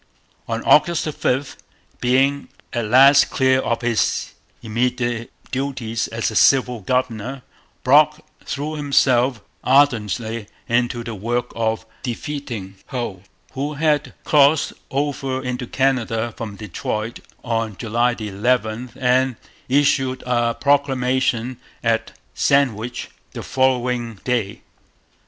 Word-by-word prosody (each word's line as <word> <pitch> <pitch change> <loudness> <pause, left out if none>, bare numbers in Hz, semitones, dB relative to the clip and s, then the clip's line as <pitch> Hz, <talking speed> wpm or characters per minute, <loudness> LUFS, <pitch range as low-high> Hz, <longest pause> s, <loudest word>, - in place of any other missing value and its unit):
On - - -3
August 170 +1 +4
5, 140 -2 -1 0.4
being 135 +3 +2 0.3
at 120 -3 -1
last 135 +5 +6
clear 130 -1 +3
of 115 -2 -1
his 115 -2 0 0.3
immediate 120 +1 -1 0.2
duties 130 -4 -2
as 115 0 -2
a - - -7
civil 125 -2 +4
governor, 125 +3 -2 0.4
Brock 150 +3 +5 0.2
threw 145 +2 -4
himself 130 -5 +2 0.2
ardently 115 -5 +2 0.2
into 120 0 0
the 115 -1 -5
work 120 +4 -2
of 110 -1 -1 0.2
defeating 120 -6 -5
Hull, 120 -8 -4 0.3
who 145 +3 -3
had 150 0 +1
crossed 145 0 +4 0.2
over 135 -2 -2
into 125 -1 -3
Canada 120 -4 0
from 110 -3 -6
Detroit 105 +3 -4 0.2
on 115 -4 -2
July 120 +2 +1
11 110 +2 -1
and 130 0 +2 0.3
issued 135 -1 +2
a 120 -1 +1
proclamation 130 -3 +1 0.3
at 115 -1 0 0.2
Sandwich 125 - +1 0.2
the - - -6
following 125 -3 0
day. 120 -6 -1
125 Hz, 105 wpm, -21 LUFS, 115-135 Hz, 0.4 s, last